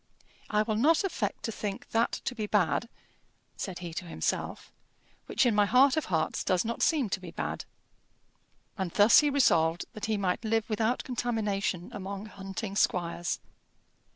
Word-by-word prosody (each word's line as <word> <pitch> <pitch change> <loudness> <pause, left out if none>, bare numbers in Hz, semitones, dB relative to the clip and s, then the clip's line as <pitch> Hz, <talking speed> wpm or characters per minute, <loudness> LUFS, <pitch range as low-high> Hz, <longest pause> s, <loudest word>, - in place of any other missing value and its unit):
"I 210 0 +2
will 215 -1 -1
not 310 - +4
affect 390 - -2
to 225 - -2
think 205 -2 -5
that 230 +1 +2
to - - -1
be 215 -4 -4
bad," 200 0 +1 0.7
said 190 -3 -5
he 170 - -6
to 180 - -5
himself, 170 - -3 0.6
"which - - +2
in 240 - +3
my 205 -1 +4
heart 260 +3 +5
of 315 - 0
hearts 160 -3 -1
does 185 0 +1
not 235 +1 -3
seem 295 -8 +3
to 200 - 0
be 185 -2 -9
bad." 170 - -4 1.1
And 190 -2 -1
thus 205 +6 +7
he 295 - +3
resolved 175 - +3
that 215 - -5
he 220 -1 +1
might 190 +2 -1
live 225 0 0
without 225 +3 0
contamination 210 -7 -2
among 200 +1 -5
hunting 195 0 -6
squires. 175 -2 0
210 Hz, 165 wpm, -29 LUFS, 185-235 Hz, 1.1 s, thus